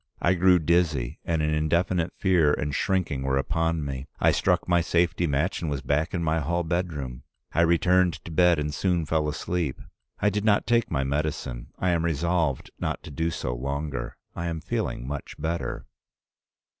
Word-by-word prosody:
I 85 Hz, -, +3 dB
grew 90 Hz, 0 st, +5 dB
dizzy, 80 Hz, -7 st, +1 dB
and 80 Hz, -2 st, 0 dB
an 75 Hz, 0 st, +1 dB
indefinite 85 Hz, +3 st, +1 dB
fear 85 Hz, -6 st, +3 dB
and 75 Hz, -1 st, -3 dB
shrinking 90 Hz, -5 st, 0 dB
were 65 Hz, 0 st, +1 dB
upon 80 Hz, +2 st, 0 dB
me. 70 Hz, 0 st, -5 dB
I -, -, +4 dB
struck -, -, +1 dB
my 85 Hz, -1 st, +4 dB
safety 85 Hz, +1 st, +1 dB
match 75 Hz, +6 st, 0 dB
and 80 Hz, -, -2 dB
was 70 Hz, -2 st, -3 dB
back 75 Hz, +5 st, 0 dB
in 85 Hz, -, -1 dB
my 80 Hz, 0 st, +1 dB
hall 85 Hz, +4 st, 0 dB
bedroom. 80 Hz, -8 st, -3 dB, 0.3 s
I 85 Hz, -, +3 dB
returned 90 Hz, +1 st, +4 dB
to 85 Hz, -, -7 dB
bed, 90 Hz, +1 st, +4 dB
and 75 Hz, 0 st, -2 dB
soon 85 Hz, +1 st, 0 dB
fell 75 Hz, 0 st, +1 dB
asleep. 80 Hz, -2 st, -2 dB, 0.4 s
I 105 Hz, -, +3 dB
did 105 Hz, 0 st, -1 dB
not 105 Hz, -2 st, +3 dB
take 120 Hz, -1 st, +2 dB
my 70 Hz, -4 st, 0 dB
medicine. 70 Hz, -4 st, -2 dB
I 90 Hz, -, +1 dB
am 85 Hz, -1 st, +1 dB
resolved 85 Hz, -3 st, 0 dB
not -, -, -2 dB
to 80 Hz, -, -9 dB
do 80 Hz, +4 st, -1 dB
so 60 Hz, -, -3 dB
longer. 70 Hz, +3 st, -4 dB, 0.2 s
I 85 Hz, -, -3 dB
am 85 Hz, -1 st, -2 dB
feeling -, -, -3 dB
much 70 Hz, 0 st, -6 dB
better. 80 Hz, -4 st, -3 dB
80 Hz, 180 wpm, -26 LUFS, 75-85 Hz, 0.4 s, grew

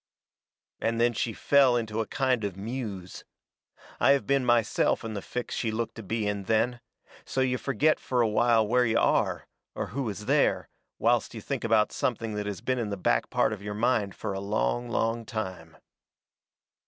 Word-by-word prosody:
And 115 Hz, 0 st, -1 dB
then 120 Hz, 0 st, +3 dB
she 115 Hz, -, -1 dB
fell 135 Hz, +1 st, +4 dB
into 110 Hz, -1 st, -3 dB
a 110 Hz, -, -4 dB
kind 130 Hz, -4 st, 0 dB
of 100 Hz, -3 st, -3 dB
a -, -, -16 dB
muse. 105 Hz, -4 st, -6 dB, 0.8 s
I 140 Hz, -, +6 dB
have 135 Hz, -6 st, 0 dB
been 140 Hz, +2 st, +2 dB
myself 120 Hz, -3 st, +2 dB
in 115 Hz, -1 st, -5 dB
the 100 Hz, -, -4 dB
fix 125 Hz, +4 st, -5 dB
she 115 Hz, -, -1 dB
looked 115 Hz, +1 st, -2 dB
to 115 Hz, -, -8 dB
be 110 Hz, +2 st, -2 dB
in 100 Hz, -1 st, -2 dB
then 115 Hz, +4 st, +1 dB, 0.4 s
so -, -, -4 dB
you 125 Hz, -1 st, +1 dB
forget 150 Hz, +3 st, +2 dB
fur 125 Hz, -2 st, 0 dB
a 115 Hz, -, +3 dB
while 110 Hz, 0 st, +3 dB
where 125 Hz, +3 st, +3 dB
you 115 Hz, -1 st, +2 dB
are, -, -, +1 dB, 0.3 s
or -, -, -3 dB
who 135 Hz, -3 st, -2 dB
is 105 Hz, +1 st, -6 dB
there, -, -, +2 dB, 0.3 s
whilst -, -, +1 dB
you -, -, -5 dB
think -, -, -4 dB
about 110 Hz, -2 st, +3 dB
something 115 Hz, -3 st, -2 dB
that 105 Hz, 0 st, -3 dB
has 100 Hz, -3 st, -5 dB
been 130 Hz, -1 st, -1 dB
in 110 Hz, -3 st, -2 dB
the 100 Hz, -, -3 dB
back -, -, +1 dB
part -, -, +2 dB
of 105 Hz, -, -7 dB
your 105 Hz, 0 st, -5 dB
mind 105 Hz, -3 st, +1 dB
fur -, -, -4 dB
a 95 Hz, -, -3 dB
long, 110 Hz, +4 st, -1 dB
long 115 Hz, 0 st, 0 dB
time. 95 Hz, -8 st, -6 dB
115 Hz, 200 wpm, -28 LUFS, 105-120 Hz, 0.8 s, I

